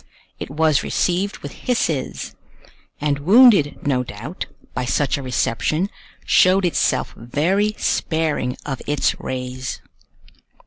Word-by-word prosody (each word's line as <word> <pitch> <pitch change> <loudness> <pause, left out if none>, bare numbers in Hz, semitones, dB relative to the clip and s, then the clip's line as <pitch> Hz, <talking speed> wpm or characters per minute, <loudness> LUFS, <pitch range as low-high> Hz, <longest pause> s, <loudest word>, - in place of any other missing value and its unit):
It - - -6
was 155 0 +2
received 190 +3 0
with - - -6
hisses; 165 - -2 0.7
and 145 -1 0
wounded, 195 - +5
no 130 -3 +1
doubt, 125 - -7 0.3
by 125 - -2
such 140 +3 +1
a 140 - -4
reception, 140 - -1 0.3
showed 185 +1 +4
itself 175 - +1
very 185 - 0
sparing 160 -6 -1
of 135 -4 -4
its 145 -1 0
rays. 130 0 -5
150 Hz, 115 wpm, -21 LUFS, 130-185 Hz, 0.7 s, wounded